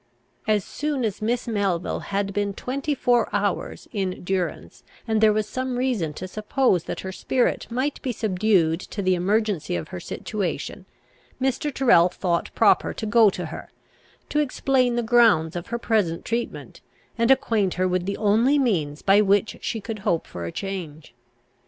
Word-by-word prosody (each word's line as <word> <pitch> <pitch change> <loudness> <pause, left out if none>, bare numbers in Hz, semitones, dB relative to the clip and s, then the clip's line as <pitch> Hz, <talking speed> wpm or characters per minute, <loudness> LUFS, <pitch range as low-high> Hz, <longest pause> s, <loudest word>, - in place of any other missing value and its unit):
As 210 -3 +2
soon 290 -4 -2
as 210 -2 -3
Miss 240 +3 -1
Melville 200 -6 -1
had 200 0 -2
been 200 -1 -1
twenty 275 +6 -2
four 245 -2 +2
hours - - -2
in 190 -4 -3
durance, 185 -1 -3 0.3
and 220 -1 +1
there 220 -1 +6
was 210 0 0
some 255 0 -3
reason 245 -11 0
to 185 +5 -6
suppose 210 -2 +1
that - - -5
her 190 - -5
spirit 245 +6 0
might 260 +5 -2
be 260 - -2
subdued 190 -6 +1
to 200 +1 -6
the 185 0 +3
emergency 190 - 0
of 85 -2 -4
her 90 - -6
situation, 200 - -4 0.5
Mr. 265 +3 0
Tyrrel 180 -11 +5
thought 175 -1 -1
proper - - +3
to 220 - -4
go 220 0 +5
to - - -5
her, - - -8 0.6
to 300 - +1
explain 260 -3 +1
the 240 - 0
grounds 220 -9 +4
of 175 +3 -5
her 235 +1 -2
present 210 -8 0
treatment, 235 +1 -4 0.3
and 230 0 +1
acquaint 225 -8 +2
her 185 +1 +1
with 180 0 -1
the 200 - -2
only 225 +7 +3
means 165 - 0
by 200 +1 +5
which 205 +1 +1
she 225 - -2
could 215 +1 -6
hope 170 -4 0
for 85 - -7
a 85 - -4
change. 170 -8 -6
210 Hz, 170 wpm, -24 LUFS, 185-240 Hz, 0.6 s, there